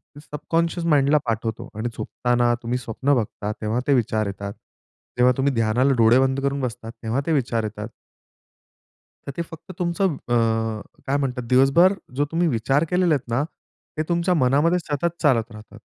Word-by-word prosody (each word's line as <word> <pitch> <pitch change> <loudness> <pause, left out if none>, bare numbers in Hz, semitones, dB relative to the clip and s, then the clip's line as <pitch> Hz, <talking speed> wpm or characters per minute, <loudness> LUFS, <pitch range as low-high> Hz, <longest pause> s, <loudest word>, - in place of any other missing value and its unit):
ते - - -10
सबकॉन्शियस 165 +3 -2
माइंडला 145 -1 +4
पाठवतो 115 +1 -3
आणि 110 +3 -2
झोपताना 120 -1 0
तुम्ही 120 +2 -1
स्वप्न 125 +3 -1
बघता 105 -3 -2
तेव्हा 110 +3 -1
ते 140 - +4
विचार 110 -3 +1
येतात. 100 +1 -5 0.6
तेव्हा 125 +1 +5
तुम्ही 135 0 +1
ध्यानाला 120 +4 +2
डोळे 115 +2 +5
बंद 135 0 +1
करून 140 0 -1
बसतात 115 -2 -5
तेव्हा 115 +5 0
ते 165 - -1
विचार 120 -5 0
येतात. 105 0 -5 1.4
तर - - -3
ते - - 0
फक्त 165 +3 -10
तुमचं 175 -1 0
अ, 120 - +1 0.7
काय 140 +1 +2
म्हणतात 125 -3 -2
दिवसभर 140 +9 +5 0.2
जो 145 +2 +1
तुम्ही 170 +1 +1
विचार 135 +7 +1
केलेला 180 -2 +2
आहेत 125 -4 -6
ना 140 - +2 0.5
ते 155 - +1
तुमच्या 170 +1 +2
मनामध्ये 155 +4 +3
सतत 170 +2 -3
चालत 120 -5 +2
राहतात. 110 0 -13
130 Hz, 165 wpm, -23 LUFS, 115-150 Hz, 1.4 s, तेव्हा